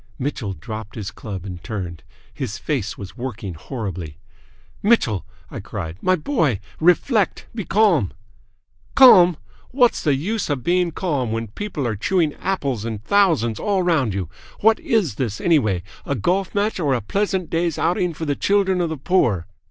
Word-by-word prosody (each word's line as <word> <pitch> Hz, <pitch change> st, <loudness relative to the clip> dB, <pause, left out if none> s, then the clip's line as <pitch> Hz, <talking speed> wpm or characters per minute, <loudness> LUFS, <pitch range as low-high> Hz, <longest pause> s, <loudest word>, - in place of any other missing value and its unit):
Mitchell 125 Hz, -7 st, -3 dB
dropped 110 Hz, +6 st, -8 dB
his 105 Hz, -4 st, -5 dB
club 95 Hz, -4 st, -7 dB
and 90 Hz, -3 st, -7 dB
turned. 90 Hz, -7 st, -5 dB, 0.3 s
His 125 Hz, -3 st, -4 dB
face 125 Hz, -5 st, -2 dB
was 100 Hz, -2 st, -9 dB
working 115 Hz, -7 st, -5 dB
horribly. 90 Hz, -, -6 dB, 0.6 s
"Mitchell!" 160 Hz, -, +2 dB, 0.2 s
I -, -, -5 dB
cried. 80 Hz, +1 st, -6 dB
"My 185 Hz, -, +3 dB
boy! 155 Hz, -, 0 dB, 0.2 s
Reflect! 185 Hz, -, +2 dB
Be 215 Hz, -5 st, -4 dB
calm!" 180 Hz, -, +3 dB, 0.8 s
"Calm! 180 Hz, -, +8 dB, 0.3 s
What's 250 Hz, -2 st, +3 dB
the 145 Hz, -4 st, +3 dB
use 205 Hz, +10 st, -2 dB
of 140 Hz, -4 st, -1 dB
being 180 Hz, 0 st, +2 dB
calm 145 Hz, -, -2 dB
when 115 Hz, -1 st, -3 dB
people 150 Hz, -, -4 dB
are 115 Hz, -2 st, -1 dB
chewing 160 Hz, -, +1 dB
apples 140 Hz, -, -1 dB
in 115 Hz, -1 st, -3 dB
thousands 120 Hz, -, +2 dB
all 195 Hz, -3 st, +1 dB
round 140 Hz, -, +1 dB
you? 95 Hz, -4 st, -2 dB, 0.3 s
What 220 Hz, +1 st, +5 dB
is 195 Hz, -, 0 dB
this, 110 Hz, -5 st, -2 dB
anyway 110 Hz, -, +2 dB, 0.2 s
a 140 Hz, -, -2 dB
golf 180 Hz, -, 0 dB
match 205 Hz, 0 st, 0 dB
or 145 Hz, -6 st, +2 dB
a 120 Hz, -, -2 dB
pleasant 190 Hz, -, -1 dB
day's 170 Hz, -1 st, 0 dB
outing 175 Hz, 0 st, 0 dB
for 160 Hz, -, -4 dB
the 145 Hz, -2 st, 0 dB
children 195 Hz, -1 st, +2 dB
of 170 Hz, -, 0 dB
the 160 Hz, -, -4 dB
poor? 120 Hz, -, +1 dB
145 Hz, 165 wpm, -21 LUFS, -, 0.8 s, Calm